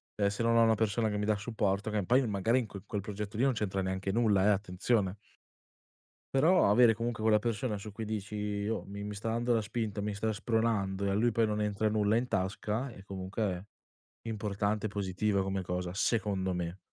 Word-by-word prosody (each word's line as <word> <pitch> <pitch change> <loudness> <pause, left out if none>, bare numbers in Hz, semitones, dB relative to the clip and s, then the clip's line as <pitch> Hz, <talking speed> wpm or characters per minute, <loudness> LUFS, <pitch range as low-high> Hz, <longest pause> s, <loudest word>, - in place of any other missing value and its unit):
ehm, 100 - +2
se 105 +3 -2
non 115 0 +3
ho 115 - +6
una 115 0 +4
persona 110 +1 +1
che 105 - -2
mi 105 - -1
dà 105 0 +2
supporto, 105 -1 -1
che 105 -2 0
poi 125 +4 +4
magari 110 +3 +2
in 115 - -3
quel 100 -2 -9
quel 105 - -3
progetto 105 0 -6
lì 120 - +1
non 135 - +4
c'entra 100 -3 -1
neanche 95 +1 -2
nulla 105 -4 +3
eh, - - +5
attenzione, 100 +1 0 1.1
però 160 - +4
avere 115 +1 +6
comunque 115 0 -3
quella 110 -1 +5
persona 115 0 -1
su 105 +2 -8
cui 110 +2 -5
dici: 105 -1 -4
"Io 105 +1 -2
mi 100 +1 -7
mi 105 0 -5
sta 110 +3 -3
dando 120 +1 +1
la 115 - +3
spinta, 110 -1 -3
mi 105 0 -2
sta 110 +2 -1
spronando", 105 -3 0
e - - +1
a - - +1
lui 115 +3 +2
poi 115 +1 +3
non 105 0 -1
entra 105 0 0
nulla 105 0 +2
in 125 +2 0
tasca 105 +6 -1
è 95 - -12
comunque 95 0 -3 0.6
importante 105 0 -1
e - - -1
positiva 100 0 0
come 95 0 -2
cosa, 90 0 -3
secondo 100 -3 0
me. 90 0 -3
105 Hz, 215 wpm, -31 LUFS, 100-110 Hz, 1.1 s, ho